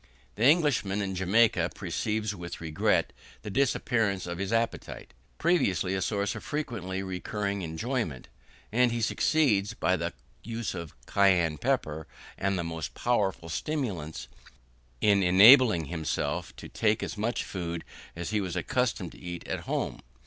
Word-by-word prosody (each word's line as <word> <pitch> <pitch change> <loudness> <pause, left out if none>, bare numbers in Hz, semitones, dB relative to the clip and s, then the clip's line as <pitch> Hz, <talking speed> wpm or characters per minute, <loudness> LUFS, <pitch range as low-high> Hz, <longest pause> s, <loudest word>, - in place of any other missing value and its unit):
The 110 - 0
Englishman 135 - +3
in 100 -2 -2
Jamaica 100 +5 +3
perceives 110 -1 -2
with 85 -3 -7
regret 80 -2 +1 0.3
the 105 - -5
disappearance 115 -6 +1
of 85 0 -5
his 100 +1 -2
appetite, 115 0 -2 0.2
previously 100 - +2
a 95 - -1
source 100 +1 0
of 110 - -8
frequently 100 -11 -3
recurring 100 +2 -3
enjoyment; 85 - -3 0.4
and 125 +2 +3
he 120 - -1
succeeds, 115 -3 +2
by 95 -5 +2
the 85 -1 -2 0.3
use 115 0 -4
of 85 -3 -7
cayenne 90 -6 +3
pepper, 75 +1 -1 0.3
and 100 -1 0
the 85 - -1
most 80 -2 -5
powerful 100 -8 0
stimulants, 90 - -3 0.7
in 100 -2 +4
enabling 100 - +7
himself 80 -1 -3
to - - -9
take 110 0 +1
as - - -4
much 110 +3 -1
food 85 -3 -4 0.3
as 85 +3 -4
he 105 -1 +1
was 90 -3 -4
accustomed 100 0 -1
to - - -15
eat 85 -1 -7
at - - -2
home. - - -2
100 Hz, 145 wpm, -28 LUFS, 85-115 Hz, 0.7 s, enabling